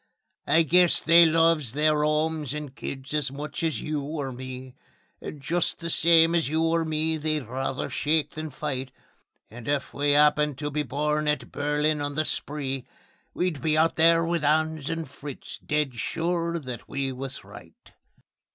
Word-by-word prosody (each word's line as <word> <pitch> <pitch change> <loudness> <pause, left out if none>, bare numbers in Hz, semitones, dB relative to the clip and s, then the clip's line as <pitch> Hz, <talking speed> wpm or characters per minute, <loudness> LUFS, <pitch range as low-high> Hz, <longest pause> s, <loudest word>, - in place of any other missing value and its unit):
I 165 - +5
guess 175 +3 +4
they 165 +1 +7
loves 160 -6 +2
their 150 +1 +2
'omes 155 -2 0
and 150 -3 -6
kids 135 0 -7
as 150 -3 0
much 145 +3 -6
as 160 -2 -1
you 150 -1 -2
or 140 -2 -4
me; 130 0 -8 0.5
And 150 - -7
just 165 +5 -1
the 170 -1 -3
same 165 0 +5
as 165 -5 +1
you 160 +2 +1
or 165 0 +2
me 160 0 -1
they'd 155 -1 -1
rather 130 +2 -3
shake 150 -1 0
than 155 0 -6
fight; 135 -2 -4 0.6
And 115 0 -10
if 145 -1 -1
we'd 145 0 +2
'appened 150 -1 +3
to 145 +1 -4
be 150 +1 -1
born 150 +2 -1
at 150 0 -1
Berlin 150 +1 0
on 145 0 -3
the 155 +1 0
Spree, 135 -4 -3 0.5
We'd 175 -5 -1
be 155 -1 +1
out 160 +1 +3
there 165 +1 +5
with 170 -2 -1
'Ans 155 0 +1
and 165 -1 -3
Fritz, 140 0 -9
dead 150 -3 0
sure 170 +7 -2
that 125 -6 -7
we 135 -1 -2
was 135 +1 -6
right. - - -15
150 Hz, 170 wpm, -26 LUFS, 140-160 Hz, 0.6 s, they